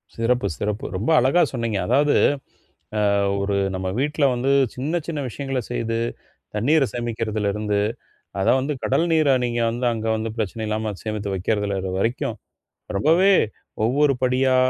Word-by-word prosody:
சிறப்பு! 120 Hz, +2 st, +1 dB
சிறப்பு! 105 Hz, 0 st, -3 dB
ரொம்ப 105 Hz, +9 st, -2 dB
அழகா 135 Hz, +8 st, +3 dB
சொன்னீங்க. 115 Hz, -4 st, -1 dB
அதாவது 145 Hz, +4 st, +3 dB, 0.8 s
அ -, -, +2 dB, 0.4 s
ஒரு 100 Hz, 0 st, 0 dB, 0.2 s
நம்ம 95 Hz, 0 st, -2 dB
வீட்டுல 150 Hz, +2 st, +1 dB
வந்து 130 Hz, +3 st, +1 dB, 0.2 s
சின்ன 140 Hz, +6 st, -3 dB
சின்ன 165 Hz, -3 st, -3 dB
விஷயங்கள 135 Hz, +1 st, -3 dB
செய்து 115 Hz, -2 st, -2 dB, 0.6 s
தண்ணீரை 135 Hz, +7 st, +3 dB
சேமிக்குறதுலருந்து, 110 Hz, -3 st, -1 dB, 0.6 s
அத 95 Hz, -, 0 dB
வந்து 135 Hz, +3 st, -1 dB
கடல் 135 Hz, +5 st, +2 dB
நீரா 155 Hz, -4 st, +4 dB
நீங்க 120 Hz, -1 st, -1 dB
வந்து 120 Hz, +2 st, -2 dB
அங்க 110 Hz, -1 st, -4 dB
வந்து 110 Hz, +1 st, -3 dB
பிரச்சனை 110 Hz, 0 st, -3 dB
இல்லாம 110 Hz, 0 st, -2 dB
சேமித்து 105 Hz, -2 st, -3 dB
வைக்கறதுல 100 Hz, +1 st, -1 dB
அது 95 Hz, -, -3 dB
வரைக்கும், 120 Hz, +4 st, -1 dB, 0.6 s
ரொம்பவே 170 Hz, -, +4 dB, 0.5 s
ஒவ்வொரு 140 Hz, +4 st, +3 dB
படியா 130 Hz, +1 st, +3 dB
120 Hz, 140 wpm, -23 LUFS, 105-135 Hz, 0.8 s, நீரா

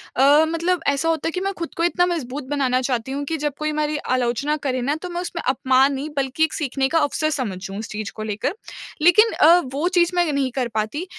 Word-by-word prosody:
अ, 285 Hz, +4 st, +5 dB
मतलब 335 Hz, +2 st, 0 dB
ऐसा 280 Hz, +4 st, +1 dB
होता 325 Hz, -1 st, 0 dB
है 330 Hz, -, -1 dB
कि 365 Hz, -, -3 dB
मैं 390 Hz, +1 st, -1 dB
ख़ुद 335 Hz, -, -5 dB
को 335 Hz, -, 0 dB
इतना 350 Hz, +1 st, +2 dB
मजबूत 295 Hz, -6 st, -3 dB
बनाना 260 Hz, -3 st, +1 dB
चाहती 250 Hz, -1 st, -2 dB
हूँ 280 Hz, +1 st, -3 dB
कि 325 Hz, +2 st, -2 dB
जब 295 Hz, -1 st, -2 dB
कोई 305 Hz, 0 st, -1 dB
हमारी 300 Hz, 0 st, -1 dB
आलोचना 255 Hz, +2 st, 0 dB
करे 255 Hz, -2 st, -1 dB
ना 285 Hz, +4 st, 0 dB
तो 360 Hz, -, -6 dB
मैं 350 Hz, 0 st, -3 dB
उसमें 345 Hz, -1 st, -5 dB
अपमान 265 Hz, +1 st, +3 dB
नहीं 275 Hz, +3 st, -4 dB
बल्कि 275 Hz, +2 st, 0 dB
एक 320 Hz, -, +1 dB
सीखने 270 Hz, -3 st, -1 dB
का 330 Hz, -, +2 dB
अवसर 310 Hz, +1 st, 0 dB
समझूँ 195 Hz, -9 st, -4 dB
उस 215 Hz, -, -5 dB
चीज़ 215 Hz, -1 st, -5 dB
को 215 Hz, -, -5 dB
लेकर। 215 Hz, -, -2 dB, 0.5 s
लेकिन, 425 Hz, +7 st, +5 dB
अ, 335 Hz, +3 st, +6 dB
वो 300 Hz, +5 st, 0 dB
चीज़ 350 Hz, -2 st, +2 dB
मैं 345 Hz, -3 st, +2 dB
नहीं 275 Hz, -3 st, 0 dB
कर 250 Hz, -1 st, -1 dB
पाती। 220 Hz, +10 st, -2 dB
290 Hz, 235 wpm, -22 LUFS, 255-330 Hz, 0.5 s, अ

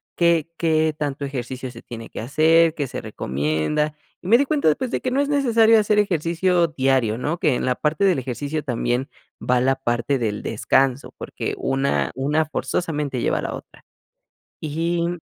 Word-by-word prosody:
qué 170 Hz, -2 st, +2 dB
qué 160 Hz, -1 st, +2 dB
tanto 145 Hz, -1 st, -3 dB
ejercicio 130 Hz, -1 st, -5 dB
se 115 Hz, -, -12 dB
tiene 115 Hz, -1 st, -9 dB
que -, -, -8 dB
hacer, 160 Hz, +5 st, +4 dB
qué 145 Hz, -3 st, -2 dB
se -, -, -6 dB
recomienda 80 Hz, -, -1 dB, 0.3 s
y -, -, -9 dB
me 230 Hz, +4 st, +6 dB
di 280 Hz, -, +2 dB
cuenta, 280 Hz, -, +2 dB
pues, 255 Hz, -, -3 dB
de -, -, 0 dB
que 255 Hz, -, -2 dB
no 270 Hz, -, +1 dB
es 285 Hz, -, -1 dB
necesario 230 Hz, -6 st, +4 dB
hacer 210 Hz, 0 st, +2 dB
ejercicio 175 Hz, -1 st, +1 dB
diario, 130 Hz, -6 st, +1 dB
¿no?, 150 Hz, +7 st, -2 dB
que 150 Hz, -6 st, +2 dB
en -, -, -2 dB
la 125 Hz, -1 st, +1 dB
parte 155 Hz, +5 st, 0 dB
del 180 Hz, -8 st, +3 dB
ejercicio 140 Hz, +5 st, -4 dB
también 120 Hz, 0 st, -1 dB, 0.3 s
va 125 Hz, 0 st, +2 dB
la 135 Hz, +1 st, +2 dB
parte 120 Hz, +1 st, -1 dB
del 105 Hz, -3 st, -2 dB
descanso 130 Hz, +4 st, +1 dB
porque -, -, -5 dB
una 135 Hz, +1 st, 0 dB
una 150 Hz, +4 st, +1 dB
forzosamente 150 Hz, -4 st, -2 dB
lleva -, -, +1 dB
a -, -, -3 dB
la -, -, -4 dB
otra. -, -, -13 dB, 0.8 s
Y. 170 Hz, +3 st, -1 dB
150 Hz, 180 wpm, -22 LUFS, 130-170 Hz, 0.8 s, me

